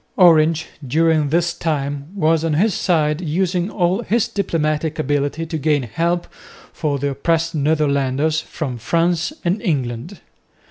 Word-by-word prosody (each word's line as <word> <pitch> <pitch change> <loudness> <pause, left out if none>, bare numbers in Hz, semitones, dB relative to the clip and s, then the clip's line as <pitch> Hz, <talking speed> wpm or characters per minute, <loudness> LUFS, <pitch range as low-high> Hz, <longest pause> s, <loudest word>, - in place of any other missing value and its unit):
Orange 160 -3 +5 0.2
during 155 +1 +2
this 170 +2 +1
time 145 -4 -2
was 160 -3 +2
on 160 -2 0
his 200 +6 +2
side 155 -3 +1
using 180 +2 0
all 185 +1 0
his 230 -1 +1
diplomatic 160 -4 -1
ability 145 +1 -1
to 160 -1 -4
gain 150 -2 +1
help 170 +9 -1 0.5
for 150 -3 -1
the 140 +1 -1
oppressed 165 +4 0
Netherlanders 150 0 +1
from 130 -7 -5
France 170 - 0
and 185 +5 0
England. 140 - -2
160 Hz, 135 wpm, -20 LUFS, 145-170 Hz, 0.5 s, Orange